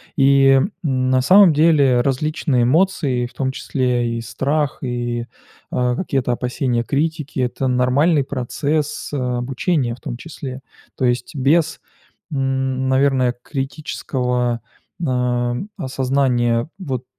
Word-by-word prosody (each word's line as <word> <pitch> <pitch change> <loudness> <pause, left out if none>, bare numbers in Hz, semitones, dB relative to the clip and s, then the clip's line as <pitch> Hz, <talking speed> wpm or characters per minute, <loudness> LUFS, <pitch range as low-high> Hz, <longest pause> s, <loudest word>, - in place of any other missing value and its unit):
И, 135 -2 +5
м, 185 - -1
на 130 -3 +1
самом 185 +5 +7
деле 145 -5 +4
различные 135 -1 0
эмоции, 135 -4 +1
в - - -20
том 130 -1 -1
числе 125 -3 -1
и - - -4
страх, 140 +5 -1
и, 120 -1 -2 0.5
а, 125 0 +1
какие-то 135 -7 -1
опасения 125 0 -1
критики- 150 +1 -2
это 130 +1 -1
нормальный 135 +5 +3
процесс 140 +4 -2
обучения, 125 +1 -1
в 125 - -20
том 120 - -5
числе. 135 -2 -8 0.3
То 130 - -1
есть 120 +3 -1
без, 155 +5 +2 0.5
м, 130 -1 -1
наверное, 130 -2 +2
критического, 125 -4 -2 0.4
а, 125 -2 0 0.2
осознания 130 -3 0
вот, 130 -8 -4
130 Hz, 115 wpm, -20 LUFS, 125-145 Hz, 0.5 s, самом